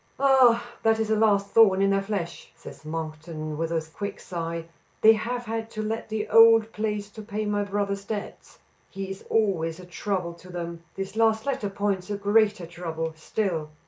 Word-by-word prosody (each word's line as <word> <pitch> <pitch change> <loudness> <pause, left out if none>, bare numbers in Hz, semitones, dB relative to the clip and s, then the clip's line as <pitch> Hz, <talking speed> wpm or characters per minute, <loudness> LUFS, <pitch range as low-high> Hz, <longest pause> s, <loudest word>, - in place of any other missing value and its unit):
"Ah! 260 -4 +5 0.2
that 225 0 +3
is 220 -1 0
a - - +4
last 205 -2 +3
thorn 210 -4 +6
in 195 0 +3
their 195 0 +2
flesh," 195 -4 -4
says - - -12
Monkton, 155 0 -5
with 165 +2 -2
a 160 -1 -1
quick 200 +1 -5
sigh. 165 -1 -4 0.4
"They 220 +1 +8
have 240 +3 -3
had 225 0 -3
to 215 -1 -4
let 220 +1 -3
the 215 -1 -2
old 225 -1 +7
place 210 -1 -2
to 215 - -9
pay 215 0 -4
my 205 0 0
brother's 200 0 -2
debts. 205 0 -6 0.3
He 195 0 -5
is 195 - -8
always 185 -7 +1
a 180 - -10
trouble 180 -1 -3
to 185 - -14
them. 170 -1 -5
This 195 +1 -5
last 220 -1 +2
letter 265 -7 -1
points 195 -2 -1
to 205 -1 -3
greater 205 -2 +2
trouble 165 -1 -4
still." 160 -1 -2
200 Hz, 185 wpm, -26 LUFS, 170-220 Hz, 0.4 s, They